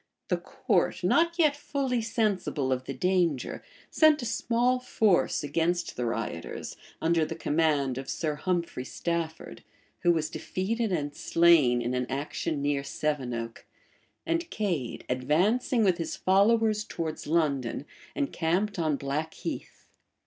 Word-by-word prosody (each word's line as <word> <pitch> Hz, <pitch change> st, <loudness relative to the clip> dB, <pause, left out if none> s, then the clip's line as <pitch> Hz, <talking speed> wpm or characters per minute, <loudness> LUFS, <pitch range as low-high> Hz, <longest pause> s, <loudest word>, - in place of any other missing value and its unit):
The -, -, +2 dB
court, -, -, 0 dB
not 335 Hz, +1 st, +3 dB
yet 305 Hz, -4 st, +4 dB
fully 270 Hz, -4 st, -1 dB
sensible 205 Hz, -, 0 dB
of 130 Hz, 0 st, -1 dB
the 135 Hz, -, -4 dB
danger, 175 Hz, -2 st, 0 dB, 0.3 s
sent 310 Hz, -4 st, +5 dB
a -, -, -3 dB
small 245 Hz, +2 st, +1 dB
force 220 Hz, -11 st, +2 dB
against 165 Hz, +4 st, 0 dB
the 120 Hz, -1 st, -2 dB
rioters, 105 Hz, -8 st, -4 dB, 0.2 s
under 165 Hz, 0 st, +2 dB
the -, -, -3 dB
command 145 Hz, -4 st, +1 dB
of 135 Hz, -, -7 dB
Sir 155 Hz, -2 st, -1 dB
Humphrey 170 Hz, -3 st, -2 dB
Stafford, 160 Hz, -, -4 dB, 0.4 s
who 175 Hz, -, +4 dB
was 160 Hz, -2 st, 0 dB
defeated 220 Hz, +3 st, -2 dB
and 145 Hz, -5 st, -1 dB
slain 155 Hz, -8 st, +4 dB
in 120 Hz, +2 st, -1 dB
an 125 Hz, 0 st, -1 dB
action 145 Hz, +2 st, -2 dB
near 145 Hz, -1 st, +1 dB
Sevenoke;[] 125 Hz, -6 st, -3 dB, 0.6 s
and 335 Hz, +1 st, -1 dB
Cade, 175 Hz, -, -2 dB
advancing 190 Hz, -, +2 dB
with 185 Hz, -3 st, +3 dB
his 165 Hz, -, -3 dB
followers 215 Hz, +3 st, +3 dB
towards 160 Hz, -6 st, -5 dB
London, 145 Hz, -5 st, 0 dB, 0.3 s
encamped 200 Hz, -, 0 dB
on 155 Hz, -3 st, +1 dB
Blackheath. 140 Hz, +4 st, -5 dB
165 Hz, 130 wpm, -28 LUFS, 140-215 Hz, 0.6 s, sent